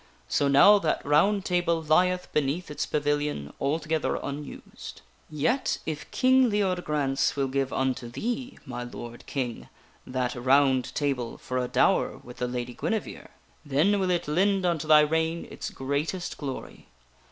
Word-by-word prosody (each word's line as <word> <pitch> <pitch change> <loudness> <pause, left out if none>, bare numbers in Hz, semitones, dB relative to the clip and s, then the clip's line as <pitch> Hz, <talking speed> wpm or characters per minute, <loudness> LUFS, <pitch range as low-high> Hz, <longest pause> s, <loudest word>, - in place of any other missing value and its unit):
So 145 - +1
now 200 +10 +7
that 160 -5 -1
ROUND 190 +8 +3
TABLE 175 -2 +1
lieth 180 +4 +2
beneath 150 +3 -1
its 150 - -3
pavilion 145 - -1
altogether 155 +2 0
unused. 140 - -8 0.3
"Yet 160 - 0
if 155 -2 -5
King 260 -1 +4
Leodegrance 180 -9 0
will 140 -1 0
give 135 0 -1
unto 130 -2 -1
thee, 240 - -4
my 125 -2 -5
lord 120 -1 -9
King, 125 -4 -4 0.4
that 125 -1 -1
ROUND 130 +1 +3
TABLE 135 -5 -1
for 130 0 -3
a 125 - -1
dower 125 - +2
with 125 0 -13
the 125 - -1
Lady 125 0 -4
Guinevere, 220 - -3 0.4
then 155 +8 +2
will 190 -1 0
it 175 -3 0
lend 190 +5 +2
unto 165 -3 0
thy 155 -1 +8
reign 160 +2 0
its - - -5
greatest 145 +7 -3
glory. 135 -3 -7
150 Hz, 145 wpm, -27 LUFS, 135-180 Hz, 0.4 s, thy